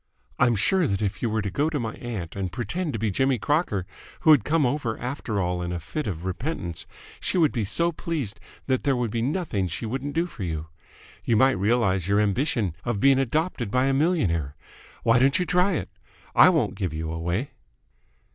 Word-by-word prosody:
I'm 120 Hz, -2 st, +4 dB
sure 175 Hz, -, +3 dB
that 100 Hz, -2 st, -1 dB
if 100 Hz, 0 st, -2 dB
you 120 Hz, -, 0 dB
were 110 Hz, -1 st, -1 dB
to 100 Hz, -, -3 dB
go 145 Hz, +11 st, +1 dB
to 150 Hz, -3 st, -2 dB
my 115 Hz, -2 st, -3 dB
aunt 110 Hz, -9 st, -6 dB
and 95 Hz, -2 st, -3 dB
pretend 150 Hz, -, -2 dB
to -, -, -1 dB
be 110 Hz, -1 st, 0 dB
Jimmy 130 Hz, +5 st, +2 dB
Crocker, 120 Hz, -, 0 dB, 0.4 s
who 160 Hz, -, +6 dB
had 145 Hz, -9 st, +6 dB
come 155 Hz, +2 st, +2 dB
over 120 Hz, -3 st, -1 dB
after 125 Hz, -4 st, -3 dB
all 90 Hz, -1 st, -1 dB
in 90 Hz, 0 st, -3 dB
a 90 Hz, -, -3 dB
fit 150 Hz, -, -4 dB
of 90 Hz, -3 st, -4 dB
repentance, 95 Hz, -, -4 dB, 0.3 s
she -, -, -1 dB
would 160 Hz, -5 st, +4 dB
be 115 Hz, -4 st, -1 dB
so 170 Hz, -, +1 dB
pleased 155 Hz, -, -3 dB, 0.3 s
that 130 Hz, -1 st, +1 dB
there 140 Hz, -2 st, +2 dB
would 120 Hz, -3 st, -1 dB
be 115 Hz, -, -1 dB
nothing 130 Hz, -, -1 dB
she 90 Hz, +7 st, -5 dB
wouldn't 135 Hz, +5 st, -4 dB
do 165 Hz, +1 st, +2 dB
for 150 Hz, -, -10 dB
you. 80 Hz, -3 st, -3 dB, 0.5 s
You 115 Hz, -, +2 dB
might 135 Hz, +4 st, +5 dB
realise 100 Hz, -4 st, +1 dB
your 100 Hz, +1 st, +3 dB
ambition 105 Hz, -, 0 dB
of 120 Hz, -4 st, -1 dB
being 135 Hz, +3 st, +5 dB
adopted 135 Hz, -, -1 dB
by 130 Hz, +4 st, +2 dB
a 135 Hz, -, +2 dB
millionaire. 100 Hz, -, +1 dB, 0.5 s
Why 115 Hz, +1 st, +4 dB
don't 135 Hz, +2 st, +4 dB
you 180 Hz, -, 0 dB
try 180 Hz, +2 st, +2 dB
it? -, -, -3 dB, 0.4 s
I -, -, +8 dB
won't -, -, +1 dB
give 90 Hz, -5 st, -3 dB
you 80 Hz, 0 st, -3 dB
away." 85 Hz, -, -2 dB
120 Hz, 210 wpm, -25 LUFS, 95-145 Hz, 0.5 s, I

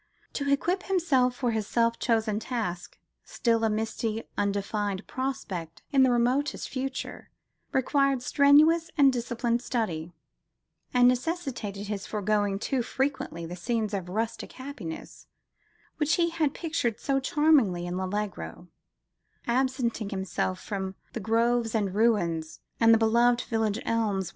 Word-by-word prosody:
To 280 Hz, -1 st, -2 dB
equip 350 Hz, +7 st, +1 dB
himself 275 Hz, -10 st, +2 dB
for 245 Hz, -2 st, 0 dB
his 220 Hz, -2 st, -2 dB
self 230 Hz, -1 st, +1 dB
chosen 220 Hz, -3 st, +1 dB
task, 215 Hz, -8 st, -4 dB, 0.3 s
still 230 Hz, -1 st, 0 dB
a 225 Hz, -, +3 dB
misty, 220 Hz, +1 st, -2 dB
undefined 200 Hz, 0 st, -1 dB
prospect 215 Hz, -12 st, -4 dB
in 275 Hz, -2 st, +4 dB
the 260 Hz, -, +6 dB
remotest 250 Hz, +4 st, +1 dB
future, 265 Hz, 0 st, -5 dB, 0.4 s
required 275 Hz, -1 st, +2 dB
strenuous 310 Hz, +5 st, +5 dB
and 275 Hz, -3 st, +6 dB
disciplined 235 Hz, 0 st, -1 dB
study; 175 Hz, -11 st, -2 dB, 0.8 s
and 245 Hz, -1 st, +5 dB
necessitated 250 Hz, -, -1 dB
his 205 Hz, -1 st, -4 dB
forgoing 205 Hz, -1 st, 0 dB
too 255 Hz, +5 st, -1 dB
frequently 265 Hz, -, -2 dB
the 175 Hz, +2 st, -6 dB
scenes 215 Hz, +3 st, -2 dB
of 185 Hz, -3 st, -3 dB
rustic 220 Hz, +4 st, -3 dB
happiness 260 Hz, -, -8 dB, 0.7 s
which 305 Hz, 0 st, +2 dB
he 340 Hz, -1 st, +1 dB
had 310 Hz, -4 st, 0 dB
pictured 310 Hz, -10 st, -1 dB
so 275 Hz, -1 st, +1 dB
charmingly 270 Hz, -, +3 dB
in 175 Hz, 0 st, -3 dB
L'Allegro, 190 Hz, -1 st, -4 dB, 0.8 s
absenting 245 Hz, -3 st, 0 dB
himself 190 Hz, -1 st, -2 dB
from 190 Hz, -2 st, -4 dB, 0.2 s
"The -, -, -3 dB
groves 230 Hz, +1 st, +1 dB
and 200 Hz, -4 st, 0 dB
ruins, 175 Hz, -8 st, +1 dB, 0.2 s
and 225 Hz, 0 st, +6 dB
the 225 Hz, -, +7 dB
beloved 235 Hz, +2 st, +3 dB
village 220 Hz, -2 st, -1 dB
elms 205 Hz, -5 st, 0 dB
230 Hz, 130 wpm, -28 LUFS, 205-265 Hz, 0.8 s, the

